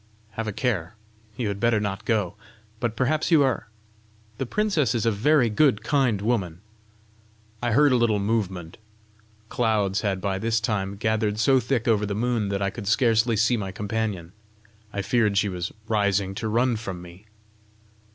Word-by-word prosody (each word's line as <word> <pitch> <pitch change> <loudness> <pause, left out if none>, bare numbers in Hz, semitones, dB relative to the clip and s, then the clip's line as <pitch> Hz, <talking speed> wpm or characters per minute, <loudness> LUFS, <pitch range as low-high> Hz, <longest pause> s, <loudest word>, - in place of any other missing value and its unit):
"Have 110 0 -4
a - - -1
care; 105 -4 -2 0.4
you 120 - -1
had 100 0 -4
better 115 0 +2
not 100 -2 -4
go! 105 -6 0 0.4
But 115 -1 -2
perhaps 150 +7 0
you 160 -4 +5
are! 130 -3 -1 0.7
The 135 - -2
princess 165 - +1
is 115 - 0
a 115 - +3
very 130 +5 +3
good, 110 -1 +2
kind 125 -6 +1
woman!" 95 -7 -1 1.0
I 120 -2 0
heard 145 +3 +5
a - - +4
little 115 -3 +2
movement. 100 -4 -2 0.7
Clouds 105 -4 +1
had 100 -3 -1
by 95 0 -2
this 115 +1 +1
time 100 -3 -2
gathered 110 0 0
so 130 +4 +4
thick 125 -1 -1
over 105 -2 +2
the 100 - -3
moon 115 -2 0
that 100 0 -1
I 100 - 0
could 100 - -8
scarcely 115 0 +3
see 115 +3 +3
my 95 -3 -4
companion: 105 -4 -3 0.6
I 100 -1 -3
feared 110 -2 +1
she 100 +1 +2
was 90 0 -4 0.2
rising 100 -3 +1
to 110 +3 -4
run 120 +2 +1
from 100 -5 -6
me. 90 +4 -14
110 Hz, 170 wpm, -25 LUFS, 100-120 Hz, 1.0 s, you